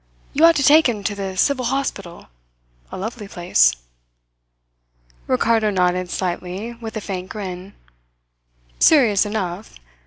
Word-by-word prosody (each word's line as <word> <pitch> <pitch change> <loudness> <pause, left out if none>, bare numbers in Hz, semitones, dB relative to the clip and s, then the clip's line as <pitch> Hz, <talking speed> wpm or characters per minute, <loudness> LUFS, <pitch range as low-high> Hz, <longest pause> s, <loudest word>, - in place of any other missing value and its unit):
You 310 +4 +4
ought 335 0 +6
to 285 - +1
take 300 0 +6
him 210 -4 -4
to 210 - -1
the 195 -2 -5
civil 255 +4 +1
hospital 200 -10 -4 0.7
a - - -6
lovely 215 +1 -6
place." 115 - +2 1.5
Ricardo 220 - +2
nodded 180 -2 0
slightly, 185 +5 -4
with 230 -1 -8
a - - -4
faint 185 -2 -6
grin. 190 -2 -7 1.0
"Serious 225 -10 +4
enough. 200 -2 -5
205 Hz, 125 wpm, -20 LUFS, 185-235 Hz, 1.5 s, ought